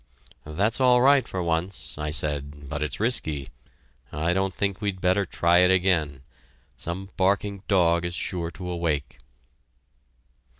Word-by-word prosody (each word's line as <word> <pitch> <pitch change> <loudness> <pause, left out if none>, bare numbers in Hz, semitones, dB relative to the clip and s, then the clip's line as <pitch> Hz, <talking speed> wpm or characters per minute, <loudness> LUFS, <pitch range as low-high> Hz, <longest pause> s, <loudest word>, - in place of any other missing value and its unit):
"That's 100 - 0
all 125 -1 +5
right 135 0 +4
for 90 -1 -3
once," 85 +3 -2
I 75 0 -2
said, 75 -1 -2
"but 75 +1 -4
it's 75 -4 -3
risky; 80 - -1 0.6
I 80 +3 0
don't 95 +1 0
think 100 +1 -2
we'd 100 -3 -2
better 95 +2 +1
try 85 +1 +3
it 90 0 +5
again. 85 -8 +1 0.5
Some 95 +3 -5
barking 100 +1 +1
dog 85 -3 +3
is 85 0 -3
sure 85 -3 -1
to 90 +1 -8
awake." 85 -5 -2
90 Hz, 140 wpm, -25 LUFS, 80-95 Hz, 0.6 s, all